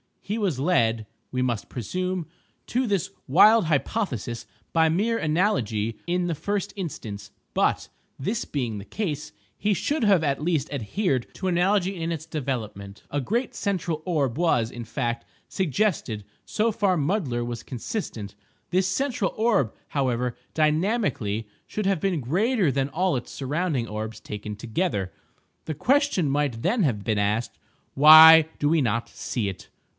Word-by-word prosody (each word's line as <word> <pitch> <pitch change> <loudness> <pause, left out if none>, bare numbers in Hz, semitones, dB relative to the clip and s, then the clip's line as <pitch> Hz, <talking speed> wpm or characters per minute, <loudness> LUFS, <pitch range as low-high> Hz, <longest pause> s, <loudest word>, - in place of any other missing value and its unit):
He 210 +3 -4
was 185 - 0
led, 115 -9 +2 0.3
we 125 - -1
must 120 -4 -1
presume, 180 - -3 0.4
to 250 +1 0
this 195 -2 0 0.2
wild 210 - +6
hypothesis 140 - -2 0.2
by 160 -1 +4
mere 215 +8 +1
analogy 130 - 0
in 180 +1 0
the 170 - 0
first 200 +5 -2
instance; 105 - -6 0.2
but, - - +1 0.3
this 210 - -2
being 120 -7 -3
the 100 - -8
case, 155 - -4 0.2
he 210 +1 +1
should 285 +5 0
have 195 -6 +4
at 140 -1 0
least 155 -3 0
adhered 135 - -1
to 190 - -3
analogy 185 +1 +1
in 165 +1 -1
its 160 -1 -6
development. 115 -10 -5
A 145 - 0
great 230 - -1
central 175 -6 -2
orb 145 -8 0
was, 125 -9 +2
in 120 -2 -7
fact, 120 0 -3 0.2
suggested; 155 - -1 0.2
so 225 +2 +1
far 200 -3 +1
Mudler 145 - 0
was 120 -1 -5
consistent. 115 - -5 0.4
This 185 +1 +2
central 225 -1 -1
orb, 215 - +2 0.2
however, 125 -3 0 0.2
dynamically, 155 - +1 0.2
should 210 - -3
have 195 -3 +2
been 180 -3 0
greater 190 - +1
than 135 0 0
all 175 0 +1
its 120 - -7
surrounding 145 -1 -1
orbs 110 +1 -5
taken 105 0 -6
together. 110 - -2 0.5
The 155 - -3
question 270 - +2
might 140 -5 0
then 230 -3 +2
have 110 -9 0
been 110 -1 0
asked—"Why 150 +9 +6
do 145 - +2
we 160 -1 +3
not 115 -2 0
see 110 -5 -3
it?" 95 - -9
155 Hz, 150 wpm, -25 LUFS, 120-190 Hz, 0.5 s, wild